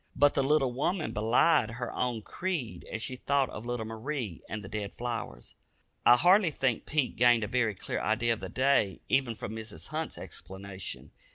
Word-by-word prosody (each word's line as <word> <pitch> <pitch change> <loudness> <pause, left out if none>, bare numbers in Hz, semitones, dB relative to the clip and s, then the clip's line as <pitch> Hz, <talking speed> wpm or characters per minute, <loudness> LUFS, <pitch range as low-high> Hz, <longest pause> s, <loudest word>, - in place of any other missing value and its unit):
But 145 0 +5
the 140 - +2
little 135 -2 +3
woman 155 +7 -1
belied 115 +4 +3
her 120 0 -4
own 120 -3 -1
creed 170 - -4
as 115 - -3
she 130 - -4
thought 140 0 +1
of 110 +3 -7
little 120 -2 -2
Marie 115 - -4
and 105 -1 -4
the - - -7
dead 105 0 -4
flowers. 115 - -5 0.5
I 120 - +9
hardly 185 - +5
think 135 -6 -1
Pete 150 -4 0
gained 120 -1 +5
a - - -1
very 115 -4 +1
clear - - -4
idea 115 +4 +2
of 110 - -6
the - - -6
day, 130 -7 +2
even 130 -4 +2
from 110 - -6
Mrs. 110 -7 -7
Hunt's - - -3
explanation. 95 0 -7
120 Hz, 185 wpm, -30 LUFS, 110-140 Hz, 0.5 s, I